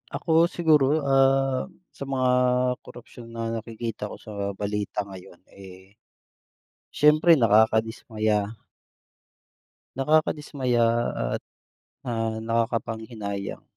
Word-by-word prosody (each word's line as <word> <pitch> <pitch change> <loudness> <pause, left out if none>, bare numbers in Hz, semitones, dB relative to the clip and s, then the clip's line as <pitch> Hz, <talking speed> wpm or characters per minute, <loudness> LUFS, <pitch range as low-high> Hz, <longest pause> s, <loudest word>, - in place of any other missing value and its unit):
Ako 165 0 +3
siguro, 155 -4 +2
ah, 135 -1 +2 0.2
sa - - -8
mga 130 -2 +1 0.5
korapsyon 120 0 -13
na 115 0 -4
nakikita 115 -1 -6
ko - - -8
sa 110 - -12 0.2
balita 105 0 -3
ngayon, 95 -2 -13
eh, 95 +2 -15 0.9
syempre 155 +3 +5
nakakadismaya. 110 -2 +2 1.5
Nakakadismaya 135 -4 +1 0.5
at, - - -18 0.6
ah, 115 -2 -2
nakakapanghinayang 115 -3 -3
115 Hz, 85 wpm, -25 LUFS, 105-135 Hz, 1.5 s, syempre